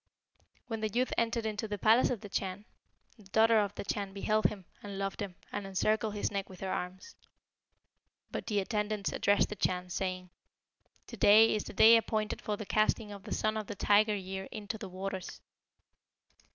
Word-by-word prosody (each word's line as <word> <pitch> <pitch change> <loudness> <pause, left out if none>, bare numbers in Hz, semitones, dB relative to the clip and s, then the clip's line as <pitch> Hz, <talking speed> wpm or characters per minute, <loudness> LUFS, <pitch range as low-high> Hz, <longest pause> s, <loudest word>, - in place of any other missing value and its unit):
When 225 -2 -4
the 215 - 0
youth 245 +4 0
entered 230 0 0
into 220 0 -2
the 205 0 -3
palace 225 +5 +4
of 240 -5 -2
the 210 - -8
Chan, 195 +1 -3 0.5
the 215 - -17
daughter 220 +3 +4
of 205 -1 -1
the - - -5
Chan 200 -1 -3
beheld 215 +2 0
him 195 -4 0 0.2
and 200 -1 -7
loved 195 +1 -3
him, 195 -3 -5 0.2
and 200 -1 -4
encircled 215 +2 0
his 205 - -1
neck 200 -1 -3
with 185 -2 -12
her 190 -1 -3
arms. 180 +1 -6 1.2
But - - -5
the 205 -3 +1
attendants 210 0 -2
addressed 205 0 +2
the 210 - -5
Chan, 180 -2 -1
saying, 185 -1 -3 0.7
'To 235 - -10
day 215 +3 +7
is 210 - -2
the - - -8
day 225 +3 +8
appointed 215 -1 -2
for 210 -1 -2
the 215 - -6
casting 215 +1 +1
of 200 -1 -10
the 215 - -8
Son 215 0 0
of 215 -2 -3
the 205 - -5
Tiger 210 +2 +3
year 190 0 -5
into 210 +1 -5
the 200 - -7
waters.' 190 0 -5
205 Hz, 190 wpm, -31 LUFS, 195-215 Hz, 1.2 s, day